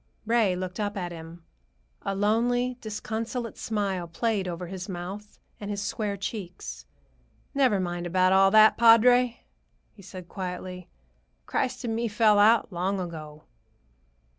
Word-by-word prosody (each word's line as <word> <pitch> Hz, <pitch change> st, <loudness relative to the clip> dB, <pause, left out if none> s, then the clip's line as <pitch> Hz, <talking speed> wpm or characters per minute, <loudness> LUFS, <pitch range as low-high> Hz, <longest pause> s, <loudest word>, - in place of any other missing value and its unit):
Ray 225 Hz, -5 st, +2 dB
looked 185 Hz, +1 st, -5 dB
up 205 Hz, 0 st, -2 dB
at 175 Hz, -2 st, -3 dB
him; 165 Hz, 0 st, -10 dB, 0.6 s
a 195 Hz, -1 st, -3 dB
lonely, 240 Hz, +5 st, +1 dB
disconsolate 225 Hz, +2 st, -4 dB
smile 195 Hz, -5 st, -2 dB
played 200 Hz, +2 st, -1 dB
over 175 Hz, 0 st, -4 dB
his 185 Hz, +2 st, -7 dB
mouth 190 Hz, +4 st, -7 dB, 0.2 s
and 205 Hz, -, -6 dB
his 205 Hz, -1 st, -3 dB
square 205 Hz, 0 st, -3 dB
cheeks. 195 Hz, -2 st, -6 dB, 0.7 s
"Never 260 Hz, -8 st, +3 dB
mind 175 Hz, -1 st, -3 dB
about 185 Hz, +1 st, +3 dB
all 195 Hz, 0 st, +6 dB
that, 215 Hz, +2 st, +6 dB
padre," 235 Hz, +1 st, +5 dB, 0.5 s
he 200 Hz, -, -16 dB
said 185 Hz, -2 st, -10 dB
quietly. 180 Hz, -1 st, -6 dB, 0.6 s
"Christ 260 Hz, 0 st, -2 dB
and 225 Hz, -2 st, -2 dB
me 235 Hz, +1 st, -1 dB
fell 215 Hz, -1 st, +4 dB
out 220 Hz, -1 st, +4 dB
long 190 Hz, +3 st, -1 dB
ago." 155 Hz, -4 st, -7 dB
200 Hz, 140 wpm, -27 LUFS, 180-225 Hz, 0.7 s, all